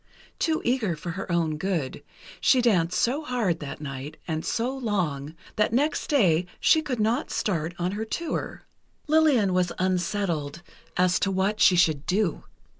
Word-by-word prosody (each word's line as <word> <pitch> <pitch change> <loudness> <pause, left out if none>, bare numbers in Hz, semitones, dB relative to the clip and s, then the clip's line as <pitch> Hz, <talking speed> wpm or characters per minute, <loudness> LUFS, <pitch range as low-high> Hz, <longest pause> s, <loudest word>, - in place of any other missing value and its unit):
Too 320 -1 0
eager 235 -8 +1
for 170 +3 -6
her 195 +1 -5
own 165 -3 +1
good: 165 -7 -2 0.4
she 260 - +4
danced 185 -8 +2
so 265 +6 +1
hard, 230 - -1
that 145 -2 -7
night, 140 0 -6
and 160 -1 -2
so 245 +4 -1
long, 170 - -2 0.2
that 210 +1 +2
next 290 +6 +1
day 180 - +3
she 315 - +4
could 255 -6 -3
not 225 +6 +1
start 170 -4 -2
on 180 +1 -1
her 210 +2 -3
tour. 330 +9 -4 0.4
Lillian 295 -11 +3
was 180 -1 +1
unsettled 175 -4 -1 0.3
as 180 0 +3
to 195 - +1
what 195 +3 0
she 185 - +6
should 155 -4 +2
do. 190 -2 0
185 Hz, 160 wpm, -26 LUFS, 165-235 Hz, 0.4 s, she